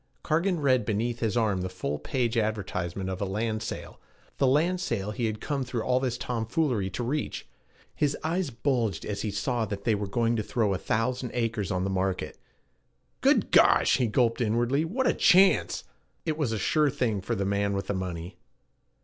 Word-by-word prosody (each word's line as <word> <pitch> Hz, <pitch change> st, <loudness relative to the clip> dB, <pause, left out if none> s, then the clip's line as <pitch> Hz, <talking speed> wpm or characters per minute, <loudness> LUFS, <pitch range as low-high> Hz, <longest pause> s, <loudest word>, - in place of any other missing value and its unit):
Cargan 170 Hz, +2 st, +1 dB
read 130 Hz, -4 st, +3 dB
beneath 115 Hz, +3 st, -1 dB
his 115 Hz, 0 st, 0 dB
arm 105 Hz, -5 st, +1 dB
the 95 Hz, -, -3 dB
full 75 Hz, -5 st, -3 dB
page 125 Hz, -3 st, -1 dB
advertisement 100 Hz, -4 st, -2 dB
of 95 Hz, 0 st, -4 dB
a -, -, +1 dB
land 110 Hz, +3 st, -2 dB
sale 115 Hz, -, -6 dB, 0.4 s
the 135 Hz, -, +4 dB
land 170 Hz, +7 st, +2 dB
sale 105 Hz, -, -2 dB
he 115 Hz, +1 st, -1 dB
had 110 Hz, -1 st, -3 dB
come 140 Hz, +1 st, -2 dB
through 125 Hz, -2 st, -3 dB
all 125 Hz, 0 st, +2 dB
this 125 Hz, -2 st, -1 dB
tomfoolery 120 Hz, -2 st, -1 dB
to 95 Hz, +7 st, -4 dB
reach. 145 Hz, +5 st, -3 dB, 0.5 s
His 145 Hz, -1 st, 0 dB
eyes 170 Hz, +1 st, 0 dB
bulged 120 Hz, -3 st, -1 dB
as 100 Hz, -1 st, -3 dB
he 110 Hz, -, -2 dB
saw 110 Hz, +4 st, -1 dB
that 100 Hz, -2 st, -5 dB
they 115 Hz, -, +2 dB
were 100 Hz, -1 st, -2 dB
going 115 Hz, +3 st, +1 dB
to -, -, +1 dB
throw 105 Hz, -2 st, 0 dB
a 95 Hz, -, -2 dB
thousand 125 Hz, +3 st, -1 dB
acres 115 Hz, -4 st, -1 dB
on 90 Hz, -2 st, -1 dB
the 95 Hz, -, -1 dB
market. 95 Hz, 0 st, -2 dB, 0.8 s
'Good -, -, +3 dB
gosh,' -, -, +5 dB
he 125 Hz, -3 st, +1 dB
gulped 115 Hz, +2 st, +1 dB
inwardly, 120 Hz, +6 st, +1 dB
'what 250 Hz, +10 st, -1 dB
a -, -, +4 dB
chance!' 190 Hz, +2 st, +4 dB, 0.4 s
It 160 Hz, -2 st, 0 dB
was 150 Hz, -7 st, -1 dB
a 110 Hz, -, -1 dB
sure 150 Hz, +7 st, +2 dB
thing 125 Hz, -8 st, -1 dB
for 115 Hz, +5 st, -2 dB
the 100 Hz, -2 st, -1 dB
man 100 Hz, 0 st, 0 dB
with 100 Hz, -, -2 dB
the -, -, -2 dB
money. 90 Hz, -2 st, -5 dB
115 Hz, 195 wpm, -27 LUFS, 100-130 Hz, 0.8 s, gosh